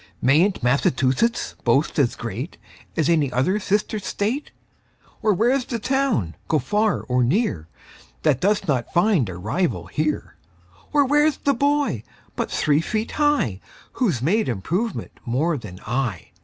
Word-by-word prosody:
Mayn't 155 +7 +3
Massachusetts 130 - +1
boast 135 +6 +2
as 130 -5 +2
great 120 - -5 0.4
As 160 -2 +2
any 155 -6 +2
other 165 +12 +1
sister 210 +2 0
state? 215 +8 -2 0.7
Or 215 - +3
where's 245 +7 +2
the 240 - -3
town, 255 - 0
go 160 - +2
far 210 - +1
or 125 -1 +1
near, 120 - 0 0.6
That 130 - +3
does 200 +1 +1
not 130 -5 0
find 175 - +3
a 90 - -6
rival 130 - -1
here? 155 0 -2 0.5
Or 290 -2 +4
where's 295 +1 +3
the 280 - +1
boy 285 - +1 0.3
but - - -2
three 150 +1 +2
feet 215 +5 -2
high 295 - +1 0.3
Who's 175 - 0
made 210 +7 +2
improvement 175 - -2
more 150 +8 0
than 105 -9 -8
I? 120 -6 -2
170 Hz, 140 wpm, -23 LUFS, -, 0.7 s, Or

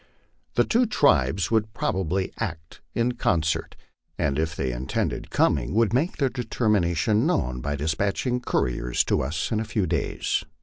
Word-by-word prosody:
The - - +5
two 240 +1 +2
tribes 140 - +2
would 110 0 +1
probably 95 -1 -1
act 80 +1 -5
in 120 +1 +2
concert, 80 -9 0 0.4
and 70 0 0
if 80 +2 -1
they 65 -5 -1
intended - - -2
coming, 65 +6 +1
would 115 -2 +3
make 150 +9 +1
their 140 - +2
determination 110 - +1
known 65 - 0
by 75 +3 -2
despatching 100 - 0
couriers 60 - 0
to - - +1
us 75 +4 -2
in 110 - +1
a - - -1
few 105 -3 -1
days. 85 -1 -1
95 Hz, 150 wpm, -25 LUFS, 75-115 Hz, 0.4 s, The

